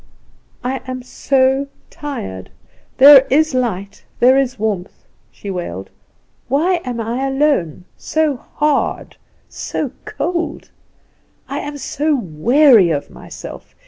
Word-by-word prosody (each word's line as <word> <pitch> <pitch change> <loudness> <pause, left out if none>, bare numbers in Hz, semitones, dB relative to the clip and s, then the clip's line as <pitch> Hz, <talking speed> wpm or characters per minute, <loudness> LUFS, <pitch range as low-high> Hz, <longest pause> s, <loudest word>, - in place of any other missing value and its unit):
"I 260 +2 -2
am 255 -1 -5
so 265 +2 +1 0.2
tired. 95 - -6 0.5
There 275 0 +9
is 310 +2 +3
light, 200 -6 -3 0.2
there 255 +2 +6
is 270 -2 0
warmth," 205 -4 -4 0.2
she 200 - -8
wailed; 100 - -6 0.6
"why 335 +7 +1
am 245 -2 -4
I 235 +4 -2
alone, 270 - 0
so 315 -2 0
hard, 295 +3 -2 0.3
so - - -4
cold? 340 -3 -3 0.8
I - - -4
am 290 0 -6
so 295 +2 -1
weary 230 - +4
of 145 -3 -2
myself! - - -11
260 Hz, 110 wpm, -18 LUFS, 205-290 Hz, 0.8 s, There